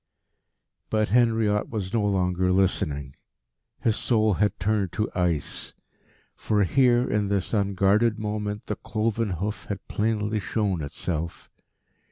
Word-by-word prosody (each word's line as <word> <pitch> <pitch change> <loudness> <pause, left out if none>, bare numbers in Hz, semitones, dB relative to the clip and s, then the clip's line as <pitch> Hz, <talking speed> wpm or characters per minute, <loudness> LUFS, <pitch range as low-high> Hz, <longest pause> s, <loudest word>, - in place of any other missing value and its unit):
But 110 -1 +1
Henriot 110 -3 +2
was 100 -5 -4
no 115 -3 +2
longer 90 -2 +1
listening. 75 -8 0 0.7
His 110 - +2
soul 110 -3 +2
had 105 +2 0
turned 100 -2 0
to 105 0 0
ice. 90 -4 -1 0.6
For 105 -1 +1
here, 125 +4 +3
in 105 -1 0
this 100 0 -1
unguarded 100 +2 +2
moment, 105 -1 -3
the 105 - -3
cloven 110 -1 -1
hoof 100 +5 -4
had 100 -2 -5
plainly 105 0 0
shown 100 -3 -1
itself. 80 +3 -4
105 Hz, 125 wpm, -25 LUFS, 95-110 Hz, 0.7 s, here